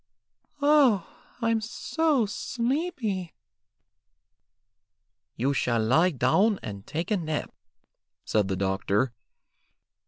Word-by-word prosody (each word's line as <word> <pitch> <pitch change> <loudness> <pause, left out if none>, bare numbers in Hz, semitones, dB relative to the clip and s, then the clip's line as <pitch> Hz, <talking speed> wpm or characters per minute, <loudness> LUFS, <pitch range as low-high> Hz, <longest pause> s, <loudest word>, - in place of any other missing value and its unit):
"Oh, 280 - +5 0.4
I'm 230 -1 +2
so 285 +3 0
sleepy." 235 - -2 2.0
"You 135 +4 0
shall 120 -3 +1
lie 160 +10 +4
down 195 - +2
and 100 -2 -7
take 165 +6 -3
a 210 - +3
nap," 155 -4 -3 0.7
said 105 -3 +1
the 95 - -1
doctor. 100 +5 0
185 Hz, 90 wpm, -27 LUFS, -, 2.0 s, Oh